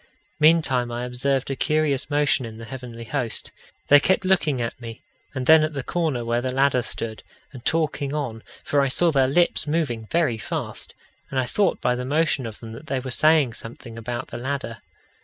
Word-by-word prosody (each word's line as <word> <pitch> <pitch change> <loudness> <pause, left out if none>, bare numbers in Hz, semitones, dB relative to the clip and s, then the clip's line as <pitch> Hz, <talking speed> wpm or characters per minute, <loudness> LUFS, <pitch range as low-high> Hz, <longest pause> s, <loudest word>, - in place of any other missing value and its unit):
Meantime 150 -6 +4
I 120 +1 -3
observed 135 +2 -1
a - - -1
curious 150 -1 0
motion 145 -2 +2
in 110 -2 -8
the 115 - -8
heavenly 120 -2 -8
host. 115 0 -2 0.4
They 145 - +8
kept 190 +5 +1
looking 160 -8 +2
at 120 +1 -4
me, 115 -1 -9 0.3
and 130 -1 -2
then 160 +1 +7
at 155 0 -1
the 135 -2 -4
corner 155 -9 -1
where 120 +1 0
the 130 0 -2
ladder 135 -1 +2
stood, 115 -2 -5 0.3
and 125 -3 -10
talking 155 -3 0
on, 135 -7 -3 0.2
for 145 - +2
I 140 - +2
saw 170 +6 +3
their 135 -3 +3
lips 170 +3 +2
moving 145 -8 -1
very 155 -10 +1
fast; - - -5 0.3
and 135 - -1
I 130 - +1
thought 200 +9 +1
by 125 - +2
the 125 0 -3
motion 145 -2 +1
of 110 - -10
them 115 -1 -8
that 140 +7 -10
they 135 -2 -1
were 130 0 -6
saying 155 -3 +4
something 115 +1 -8
about 120 +2 -5
the - - -6
ladder. 130 -3 -4
130 Hz, 200 wpm, -24 LUFS, 120-150 Hz, 0.4 s, They